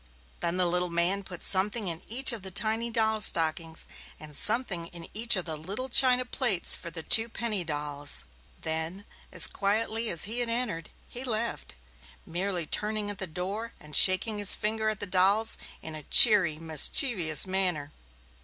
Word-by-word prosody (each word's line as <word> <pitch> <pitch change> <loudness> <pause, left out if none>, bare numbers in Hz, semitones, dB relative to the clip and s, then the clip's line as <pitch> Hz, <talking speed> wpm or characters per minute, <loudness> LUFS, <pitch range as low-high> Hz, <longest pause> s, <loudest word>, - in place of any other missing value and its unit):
Then 170 +1 -4
the 180 - 0
little 180 +1 -2
man 170 +4 -1
put 185 -3 -9
something 205 +2 0
in 165 -1 -4
each 255 +3 +2
of 225 - -5
the 190 - -5
tiny 220 +5 -1
doll 220 -1 0
stockings, 160 -2 -1 0.3
and 150 -1 -13
something 210 - 0
in 170 -1 -11
each 230 +2 +2
of 185 -2 -2
the 160 -2 -5
little 200 - -6
china 255 0 +4
plates 240 -8 +3
for 170 - -9
the 165 -1 -5
two 225 +6 +4
penny 220 -5 -4
dolls. 145 - -2 0.4
Then, 160 +5 -6 0.3
as - - +3
quietly 220 +3 -2
as 170 - +2
he 225 +4 -2
had 240 -1 -1
entered, 230 -9 -3 0.2
he 245 - -8
left, 230 - -4 0.5
merely 180 0 -4
turning 210 +3 -3
at 200 - -11
the 190 - -1
door 195 +8 -6
and 150 0 -6
shaking 205 +3 +3
his 205 -1 +6
finger 220 0 -3
at 215 -1 -4
the - - 0
dolls 200 +4 +2 0.2
in 160 - -8
a 155 - -9
cheery, 180 - +6
mischievous 160 - +3
manner. 180 -6 -3
195 Hz, 170 wpm, -26 LUFS, 165-220 Hz, 0.5 s, his